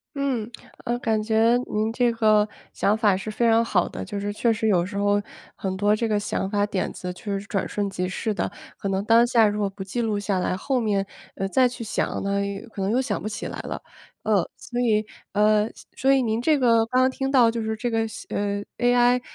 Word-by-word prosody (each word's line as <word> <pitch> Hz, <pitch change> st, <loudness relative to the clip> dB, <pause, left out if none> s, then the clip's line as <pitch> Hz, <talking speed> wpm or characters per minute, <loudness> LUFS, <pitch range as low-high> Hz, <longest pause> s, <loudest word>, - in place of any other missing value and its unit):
嗯， 255 Hz, -5 st, -1 dB, 0.4 s
呃， 240 Hz, -1 st, 0 dB
感 220 Hz, -2 st, 0 dB
觉 225 Hz, +2 st, +3 dB, 0.2 s
您 215 Hz, +1 st, 0 dB
这 245 Hz, -1 st, +2 dB
个 215 Hz, -2 st, +3 dB, 0.3 s
想 210 Hz, +2 st, +1 dB
法 210 Hz, -4 st, +3 dB
是 195 Hz, +3 st, -5 dB
非 230 Hz, +2 st, +1 dB
常 230 Hz, 0 st, +4 dB
好 190 Hz, -6 st, +1 dB
的， 95 Hz, -, -6 dB
就 200 Hz, -, -5 dB
是 205 Hz, +1 st, -3 dB
确 235 Hz, +2 st, +2 dB
实 220 Hz, 0 st, 0 dB
有 180 Hz, -5 st, +3 dB
时 200 Hz, +2 st, -5 dB
候， 205 Hz, 0 st, +2 dB, 0.3 s
很 190 Hz, -1 st, -3 dB
多 205 Hz, +1 st, +3 dB
这 230 Hz, +2 st, -1 dB
个 210 Hz, -1 st, +1 dB
想 200 Hz, -1 st, -2 dB
法 205 Hz, -1 st, +1 dB
点 195 Hz, -3 st, -2 dB
子 180 Hz, 0 st, -6 dB
确 180 Hz, -, -16 dB
实 200 Hz, -1 st, -1 dB
是 200 Hz, -, -10 dB
转 200 Hz, -3 st, -2 dB
瞬 205 Hz, -1 st, -1 dB
即 180 Hz, -1 st, -2 dB
逝 215 Hz, +3 st, -2 dB
的。 -, -, -2 dB, 0.3 s
可 195 Hz, -, -3 dB
能 195 Hz, +1 st, -1 dB
当 230 Hz, +1 st, +6 dB
下 230 Hz, -2 st, +5 dB
如 210 Hz, 0 st, -1 dB
果 200 Hz, -, 0 dB
不 195 Hz, 0 st, -8 dB
记 220 Hz, +6 st, -3 dB
录 215 Hz, -3 st, 0 dB
下 200 Hz, -2 st, -1 dB
来 185 Hz, 0 st, -1 dB
后 255 Hz, +4 st, 0 dB
面， 200 Hz, -3 st, 0 dB, 0.3 s
呃， 195 Hz, -, -2 dB
再 255 Hz, +5 st, +3 dB
去 245 Hz, -1 st, -7 dB
想 220 Hz, -, -2 dB
呢， 200 Hz, 0 st, 0 dB
又 200 Hz, +3 st, -5 dB
可 200 Hz, -, -7 dB
能 190 Hz, -, 0 dB
又 245 Hz, +4 st, +2 dB
想 265 Hz, -, -2 dB
不 215 Hz, -, -3 dB
起 210 Hz, -, -5 dB
来 -, -, -6 dB
了。 -, -, -5 dB, 0.4 s
呃， 205 Hz, -5 st, +3 dB
所 245 Hz, 0 st, -5 dB
以 215 Hz, -3 st, +2 dB, 0.3 s
呃， 210 Hz, +1 st, +3 dB, 0.3 s
所 270 Hz, +2 st, +2 dB
以 270 Hz, -1 st, +4 dB
您 225 Hz, 0 st, 0 dB
这 305 Hz, +3 st, +3 dB
个 230 Hz, -4 st, +4 dB
刚 255 Hz, +2 st, +2 dB
刚 260 Hz, 0 st, +3 dB
听 270 Hz, +1 st, -2 dB
到 250 Hz, -4 st, +5 dB
就 230 Hz, 0 st, -3 dB
是 220 Hz, 0 st, -2 dB
这 240 Hz, +2 st, -3 dB
个 225 Hz, 0 st, +1 dB
新 220 Hz, -, -9 dB
呃 205 Hz, 0 st, -1 dB, 0.2 s
，AI， 245 Hz, 0 st, +4 dB
215 Hz, 265 characters per minute, -24 LUFS, 200-235 Hz, 0.4 s, 当